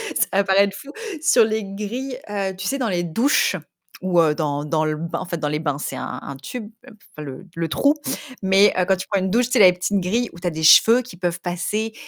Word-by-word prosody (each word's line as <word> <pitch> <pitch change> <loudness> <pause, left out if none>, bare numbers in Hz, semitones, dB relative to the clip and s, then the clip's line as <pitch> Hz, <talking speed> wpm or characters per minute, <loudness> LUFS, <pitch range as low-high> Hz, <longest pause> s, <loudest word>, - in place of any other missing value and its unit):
ça - - +2
va 200 - +3
paraître 195 0 +3
fou, 280 +5 -10 0.3
sur 255 -8 +5
les 220 -1 -2
grilles, 235 +7 -5
heu, 195 -2 -2
tu - - -4
sais, 275 - -1
les 175 -1 -1
douches 230 - +2 0.5
ou, 180 -2 +2
heu, 155 -2 +3
dans 145 -2 -2
dans 155 +1 0
le 155 0 -1
bain, 165 +1 -4
en 185 - -5
fait 170 - -4
dans 150 -2 -2
les 150 +1 -1
bains, 145 -3 -2
c'est 140 - -5
un 135 +1 -6
tube, 220 - -6 0.2
enfin 210 -10 -13
le 145 +7 -9
le 165 -1 -2
trou. 285 +1 +3 0.5
Mais, 195 +2 +5
heu, 180 - +3
quand 190 0 +2
tu 190 - -6
prends 200 -2 +1
une 190 - -1
douche, 240 +5 +2
tu 250 - -8
sais 250 - +4
la 185 -3 +8
petite 185 +2 -1
grille 225 +7 -1
où 170 - -12
tu 180 - -10
as 175 - +2
des 160 -1 -5
cheveux 230 +9 +7
qui 250 -6 -12
peuvent 175 0 -2
passer, 185 +6 -3
190 Hz, 250 wpm, -21 LUFS, 165-220 Hz, 0.5 s, la